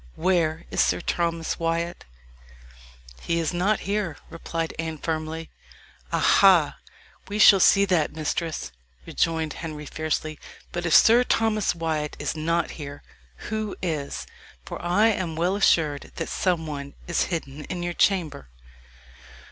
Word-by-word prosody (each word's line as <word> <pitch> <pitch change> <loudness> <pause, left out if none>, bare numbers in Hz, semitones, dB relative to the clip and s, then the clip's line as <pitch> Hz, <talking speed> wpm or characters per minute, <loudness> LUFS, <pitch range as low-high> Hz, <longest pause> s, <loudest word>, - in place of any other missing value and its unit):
Where 165 -2 +1
is - - +2
Sir - - +2
Thomas 170 -1 -2
Wyat?" 165 +1 -2 1.2
"He 170 - -1
is 165 +1 -1
not 195 +4 +1
here," 200 -6 -2
replied 165 0 -4
Anne 160 -1 -3
firmly. 160 +1 -4 0.6
"Aha! - - +5 0.5
we 205 - -4
shall 205 -2 +8
see 200 +2 +5
that, 180 -5 +1
mistress," 155 - -3 0.3
rejoined 160 -2 -1
Henry 155 -2 -7
fiercely. 155 0 -3 0.3
"But 175 0 -3
if 165 - +4
Sir 235 +6 +7
Thomas 215 -6 +1
Wyat 160 -3 -2
is - - -3
not 165 +2 0
here, 145 0 -8 0.5
who 215 -2 -2
is? 155 -5 -3 0.4
for - - -7
I 180 +6 +3
am 185 -6 -2
well 175 +4 +1
assured 155 -8 +2
that - - -4
some 175 -4 0
one 140 -2 -6
is 175 - 0
hidden 150 -4 -5
in 175 -1 -5
your 175 0 -2
chamber." 170 - +1
165 Hz, 135 wpm, -25 LUFS, 155-180 Hz, 1.2 s, shall